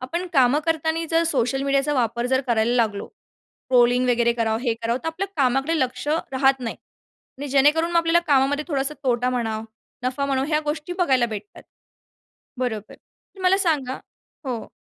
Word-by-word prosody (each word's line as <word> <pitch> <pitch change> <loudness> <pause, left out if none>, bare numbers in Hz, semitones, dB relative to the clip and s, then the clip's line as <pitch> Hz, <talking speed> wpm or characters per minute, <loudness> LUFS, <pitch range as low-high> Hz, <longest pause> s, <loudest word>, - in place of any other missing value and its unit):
आपण 340 +8 -4
कामं 270 +1 +4
करताना 325 +1 0
जर 330 +1 +3
सोशल 270 -2 0
मीडियाचा 275 +1 +1
वापर 235 -1 0
जर 260 +1 +2
करायला 235 0 +1
लागलो, 215 -4 0 0.6
ट्रोलिंग 250 0 +4
वगैरे 235 -1 +2
करावं, 225 -1 0
हे 235 -3 0
करावं 230 +2 0
तर - - -3
आपल्या 370 +5 -3
कामाकडे 270 +4 +1
लक्ष 260 +3 -2 0.2
राहत 270 0 +2
नाही 230 -2 -4 0.6
आणि 290 - -4
जेणेकरून 295 +5 +3
मग 340 - +2
आपल्याला 335 +1 +3
कामामध्ये 285 +1 +2
थोडासा 280 -1 -1
तोटा 250 -1 +1
म्हणा, 225 -3 -2 0.4
नफा 260 +2 -1
म्हणा 270 -1 0
ह्या 305 -1 +1
गोष्टी 305 +3 -3
बघायला 265 -9 +3
भेटतात 210 -2 -8 1.0
बरोबर 220 -5 -3
तर 385 - -20
मला 370 +1 +4
सांगा 295 -9 0 0.5
हो. 240 -3 -4
265 Hz, 160 wpm, -23 LUFS, 240-300 Hz, 1.0 s, कामं